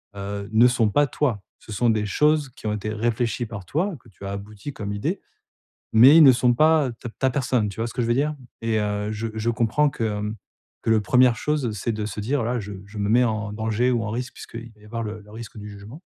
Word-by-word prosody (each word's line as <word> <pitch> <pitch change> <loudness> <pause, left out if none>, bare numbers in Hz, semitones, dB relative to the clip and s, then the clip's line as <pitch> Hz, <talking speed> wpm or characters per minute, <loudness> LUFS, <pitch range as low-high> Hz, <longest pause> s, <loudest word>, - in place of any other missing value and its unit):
heu, 100 +1 -5
ne 115 +3 +6
sont 120 -3 +2
pas 145 +7 +3
toi. 125 -6 -1 0.2
Ce 110 - -13
sont 120 +3 +2
des 110 -2 +1
choses 150 +6 +2
qui 115 - -9
ont 105 - 0
été 105 0 -3
réfléchies 120 +2 -1
par 100 -5 -8
toi, 170 - -1
que 115 - -19
tu 100 +1 -12
as 100 - -4
abouties 105 +6 -7
comme 100 -4 -5
idée, 100 - -2 0.7
mais 130 +7 +8
ils 165 - +9
ne 135 - +9
sont 120 0 +3
pas, 155 0 +4
heu, 120 - -6
ta 120 - -5
ta 130 +4 0
personne, 125 -5 0
tu 100 - -10
vois 115 - -1
ce - - -8
que 125 - -1
je - - -1
veux 120 - +2
dire? 150 0 -2 0.3
Et 115 -1 0
heu, 105 0 -1
je 110 +1 -3
je 110 +2 -1
comprends 120 +6 +2
que, 120 - -5
hem, 105 0 -2 0.5
que - - -1
le 110 -1 +4
première 125 +3 +4
chose, 145 -5 -1
c'est 115 +4 -2
de 105 -1 -3
se 105 0 -5
dire: 140 +7 0
«Voilà, 120 +1 -1
je 105 0 -7
je 105 +2 -11
me 100 0 0
mets 120 +3 +5
en 110 -2 -2
danger 110 +3 0
ou 120 -2 0
en 110 - -3
risque 125 +3 -4
puisqu'il 115 0 -9
va 105 - -24
y - - -16
avoir 115 +2 -4
le 105 0 -6
le 105 +1 -17
risque 115 0 -9
du 105 0 -8
jugement», 105 - -11
115 Hz, 265 wpm, -24 LUFS, 105-125 Hz, 0.7 s, ils